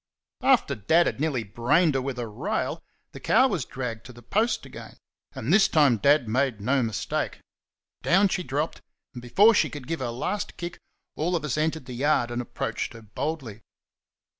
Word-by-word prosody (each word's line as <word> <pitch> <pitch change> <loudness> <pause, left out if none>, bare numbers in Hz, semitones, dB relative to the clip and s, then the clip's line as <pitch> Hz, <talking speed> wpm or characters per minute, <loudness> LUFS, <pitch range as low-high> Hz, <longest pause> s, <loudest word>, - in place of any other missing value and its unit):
After 255 - +3
Dad 160 - +3
had - - -2
nearly 145 -6 0
brained 120 - +2
her 135 - 0
with 130 -1 -4
a 120 -2 -3
rail 150 - -3 0.3
the - - -10
cow 260 - +4
was 180 - -2
dragged 120 -4 -5
to - - -10
the 120 -1 -15
post 220 - 0
again; - - -11 0.4
and - - -1
this 215 - +6
time 145 -7 +4
Dad 140 +3 +3
made 125 0 0
no 130 +6 +1
mistake. 115 -3 -2 0.6
Down 195 +3 +4
she 180 - -1
dropped, 150 0 -3 0.3
and, 120 - -8
before 195 - +5
she - - +2
could 145 -4 -8
give 165 +3 -3
her 130 -2 -2
last 185 - -3
kick, 175 0 -6 0.4
all 175 +4 0
of 160 -3 -2
us 150 - -1
entered 155 -1 -1
the 125 - -8
yard 130 -1 +1
and 120 0 -2
approached 120 - -4
her 115 - -12
boldly. 115 -1 -5
140 Hz, 190 wpm, -26 LUFS, 120-165 Hz, 0.6 s, this